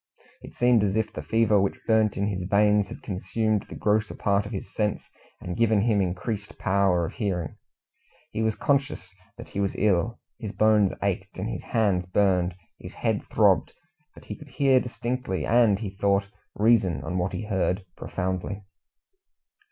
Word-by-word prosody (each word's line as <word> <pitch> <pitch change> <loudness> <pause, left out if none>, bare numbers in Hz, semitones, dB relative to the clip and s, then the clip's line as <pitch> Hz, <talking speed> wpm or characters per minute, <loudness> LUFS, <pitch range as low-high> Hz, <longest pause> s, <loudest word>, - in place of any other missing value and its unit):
It - - -12
seemed 120 -3 +4
as 100 -1 0
if 110 -1 -1
the - - -5
fever 110 -3 +3
which 100 - -1
burnt 110 -2 +2
in 100 - 0
his 100 -3 -2
veins 105 0 +3
had - - -10
consumed 105 +3 -1
the - - -8
grosser 105 0 0
part 100 0 +1
of - - -9
his 95 -2 -6
sense, 105 -1 -1 0.3
and 90 - -5
given 110 -2 +3
him 105 -2 +2
increased 100 +3 -3
power 95 -3 +2
of - - -6
hearing. 90 - -3 0.7
He 110 - -3
was 110 -1 +1
conscious 140 -10 -1 0.2
that - - -10
he - - -5
was 100 -1 -1
ill. 105 +2 +1 0.2
His 110 -2 -6
bones 110 -3 +4
ached, 100 0 -2
his 105 +4 -4
hands 100 -6 0
burned, 90 -2 +2 0.2
his - - -10
head - - 0
throbbed, - - +3 0.4
but - - -15
he - - -6
could 150 - -14
hear 135 0 +3
distinctly, 125 -4 -3
and, 115 -4 +4
he 100 -2 -5
thought, 100 0 +1 0.3
reason 100 - +3
on 90 +4 -2
what 90 +2 -1
he - - -3
heard 95 -2 -1
profoundly. 95 +2 -4
100 Hz, 170 wpm, -26 LUFS, 95-110 Hz, 0.7 s, seemed